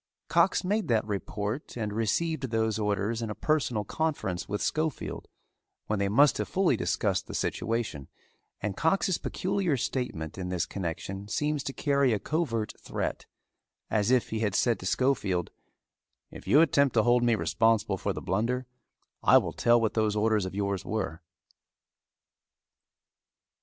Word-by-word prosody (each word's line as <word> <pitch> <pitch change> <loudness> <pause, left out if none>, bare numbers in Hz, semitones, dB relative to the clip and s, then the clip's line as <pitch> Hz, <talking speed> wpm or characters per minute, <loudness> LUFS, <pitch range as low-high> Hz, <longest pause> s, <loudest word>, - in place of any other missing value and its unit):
Cox - - +3
made 210 +3 0
that 110 -3 +2
report 105 +5 -4
and 105 -3 -2
received 130 +6 0
those 110 -1 0
orders 105 +2 -1
in 115 - -3
a 105 - -4
personal 135 -8 0
conference 105 - -2
with 105 +1 -1
Schofield 155 -1 -2 0.6
when 110 -1 -1
they 100 0 +1
must 140 +8 +4
have - - -1
fully 185 -8 +2
discussed - - 0
the - - -6
situation, 110 - -2 0.5
and 100 -2 -2
Cox's 185 - +1
peculiar 185 -6 -1
statement 95 - -3
in 90 -1 -4
this 90 -2 0
connection 95 +2 -5
seems 150 +6 -1
to - - -2
carry 140 -3 +2
a 105 - 0
covert 120 -9 -1
threat, - - -4 0.6
as 105 0 +2
if 125 -1 +2
he 110 - -1
had 105 -3 0
said 120 -2 +2
to 95 - -4
Schofield, 100 -7 0 0.8
"If - - -11
you 150 - +6
attempt 140 -5 +3
to 110 - +5
hold 120 +1 +4
me 120 -1 +4
responsible 110 -3 +1
for - - -1
the - - -6
blunder 115 +7 0 0.6
I - - +7
will - - 0
tell 120 0 +4
what 110 -2 0
those 110 -2 +1
orders 105 -2 +2
of 95 - -8
yours 100 -1 -1
were." 95 -6 -3
110 Hz, 155 wpm, -28 LUFS, 100-135 Hz, 0.8 s, I